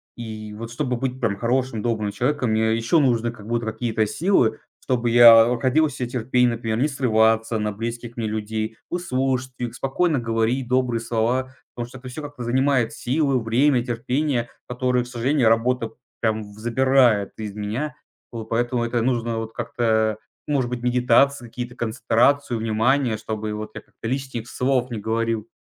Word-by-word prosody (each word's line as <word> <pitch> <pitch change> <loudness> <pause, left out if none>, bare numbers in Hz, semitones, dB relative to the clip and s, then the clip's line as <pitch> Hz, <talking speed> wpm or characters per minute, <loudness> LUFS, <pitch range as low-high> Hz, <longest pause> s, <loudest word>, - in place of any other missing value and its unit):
И 110 -2 -7
вот 115 +2 -7
чтобы 125 0 -2
быть 130 +1 -3
прям 115 -5 0
хорошим, 120 -1 0
добрым 110 -3 -1
человеком, 125 -1 0
мне 110 0 +2
еще 115 +9 +2
нужны 120 -4 +2
как 110 -3 -13
будто 120 0 -1
какие-то 110 -1 -1
силы, 115 - +1 0.2
чтобы 120 -2 0
я, 115 -1 +9
а, - - 0
находил 135 +6 +2
в - - -7
себе 125 -3 -4
терпение, 125 0 +1
например, 115 -1 -2
не 135 +6 +2
срываться 115 -4 +2
на 105 0 -1
близких 115 +2 -6
мне 115 - -2
людей, 110 +1 -3
выслушать 130 -6 -1
их, 120 -1 -4
спокойно 140 +4 0
говорить 115 +2 0
добрые 125 -2 +1
слова. 120 +3 -1 0.2
Потому 120 -1 -5
что 130 - -11
это 130 - -11
всё 130 +4 -7
как-то 145 -4 -7
занимает 130 -1 +1
силы, 135 0 0
время, 125 +3 +2
терпение, 125 +1 -1 0.2
которые, 125 0 0
к - - -11
сожалению, 125 0 +1
работа 115 +1 +1 0.3
прям 110 -1 0
в 105 - -15
забирает 120 -3 +3
из 105 -2 -5
меня. 115 +7 -3 0.4
Вот. 115 -2 -6
Поэтому 120 +1 0
это 120 0 0
нужно 115 -2 0
вот 115 0 -5
как-то, 110 -2 0 0.3
может 135 -4 0
быть, 125 -1 -4
медитации 125 +2 +3
какие-то, 120 +1 -7
концентрацию 120 +2 +1
внимания, 115 +2 +1
чтобы 110 -1 -4
вот 105 0 -6
я - - -6
как-то - - -10
лишних 130 -2 -3
слов 125 -1 0
не 110 - -3
говорил. 115 0 -1
120 Hz, 170 wpm, -23 LUFS, 110-130 Hz, 0.4 s, я